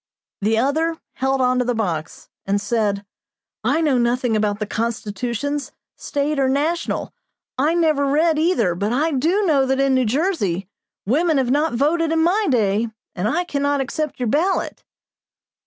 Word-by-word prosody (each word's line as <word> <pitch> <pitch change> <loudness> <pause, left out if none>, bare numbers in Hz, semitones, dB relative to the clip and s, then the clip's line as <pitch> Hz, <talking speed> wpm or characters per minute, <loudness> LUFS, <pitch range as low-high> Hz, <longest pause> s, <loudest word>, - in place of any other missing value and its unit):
The 220 +2 +2
other 315 +7 +1 0.2
held 265 +1 0
on 255 0 +2
to - - +2
the 245 0 0
box, 170 -8 -3 0.2
and 200 +1 +1
said 205 -2 -1 0.6
"I 325 - +2
know 285 -6 +2
nothing 240 -1 +1
about 210 -1 0
the 215 - -3
Constitutions, 235 +6 -3 0.2
State 285 +1 -2
or 265 -1 +2
national. 305 +5 -1 0.5
I 305 +5 +2
never 310 -4 +2
read 310 +2 +2
either; 310 - +2
but 200 +5 -2
I 300 +6 +1
do 325 +10 +1
know 300 -7 +3
that 265 0 +1
in 275 -1 +3
New 260 -1 +2
Jersey, 215 - 0 0.4
women 310 - +2
have 255 -2 +1
not 295 +2 +1
voted 315 +5 +1
in 325 0 +2
my 395 +5 +2
day, 220 -3 +2 0.3
and 180 +3 -2
I 330 +10 +1
cannot 285 -3 0
accept 290 +2 -3
your 245 - -1
ballot." 335 - 0
270 Hz, 165 wpm, -21 LUFS, 225-315 Hz, 0.6 s, know